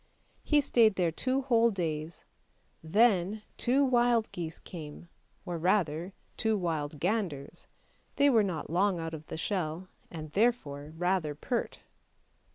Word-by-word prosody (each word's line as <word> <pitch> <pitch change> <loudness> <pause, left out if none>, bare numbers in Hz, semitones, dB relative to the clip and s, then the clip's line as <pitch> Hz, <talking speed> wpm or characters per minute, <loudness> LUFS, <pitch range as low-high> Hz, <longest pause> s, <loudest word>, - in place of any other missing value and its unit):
He 295 -1 +3
stayed 230 -6 +4
there 175 -3 +1
two 260 +10 -1
whole 235 -3 +4
days, 165 -5 -4 0.6
then 205 +2 +2
two 270 +3 +2
wild 240 -3 +2
geese 165 -2 -5
came, 160 0 -10 0.4
or 175 -2 -4
rather 175 -1 +1 0.3
two 220 -1 +1
wild 155 -5 -2
ganders, 175 -5 -2 0.5
they 285 - +4
were 235 -6 +5
not 175 -7 -3
long 185 +1 +2
out 165 0 -4
of 155 -1 -8
the - - -6
shell, 175 0 -3 0.2
and 155 -3 -8
therefore 155 -9 0
rather 175 -4 0
pert. 235 - -3
180 Hz, 135 wpm, -30 LUFS, 160-225 Hz, 0.6 s, were